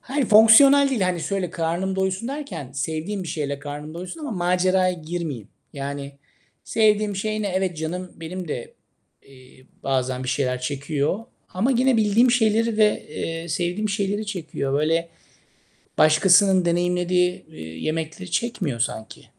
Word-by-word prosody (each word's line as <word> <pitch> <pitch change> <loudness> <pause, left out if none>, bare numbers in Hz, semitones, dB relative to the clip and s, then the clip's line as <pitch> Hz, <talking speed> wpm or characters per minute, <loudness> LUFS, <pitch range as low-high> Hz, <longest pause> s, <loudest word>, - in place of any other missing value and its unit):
Hayır 275 0 -2
fonksiyonel 270 +7 +7
değil. 255 -5 -1
Hani, 185 -2 0
şöyle 190 -2 -2
karnım 175 +3 -2
doysun 190 +5 -1
derken 190 - -6
sevdiğim 160 +8 -3
bir 175 - -7
şeyle 140 -2 -3
karnım 145 +2 -7
doysun 180 - -7
ama 295 - -5
maceraya 185 -1 +2
girmeyeyim. 160 - -5 0.2
Yani, 140 0 -5 0.5
sevdiğim 210 -2 +2
şey 215 +2 -2
ne? 200 - -1
Evet, 185 -2 -1
canım 175 +3 -4
benim 170 +1 -7
de, 120 - -6 0.5
eee, 130 -1 -18 0.2
bazen 130 -1 -1
bir 130 - -5
şeyler 125 -2 -1
çekiyor 145 - -2 0.3
ama 225 +9 +1
gene 255 0 +3
bildiğim 220 +3 +4
şeyleri 230 -1 +2
ve, 210 -1 +2
eee, 165 +2 -5
sevdiğim 180 +6 -1
şeyleri 205 +1 -2
çekiyor. 165 -8 -4
Böyle, 160 +4 +1 0.9
başkasının 185 +4 +5
deneyimlediği, 180 +1 +1
eee, 160 - -14
yemekleri 155 - -5
çekmiyor 185 - -2
sanki. 110 -1 -4
180 Hz, 140 wpm, -23 LUFS, 155-205 Hz, 0.9 s, fonksiyonel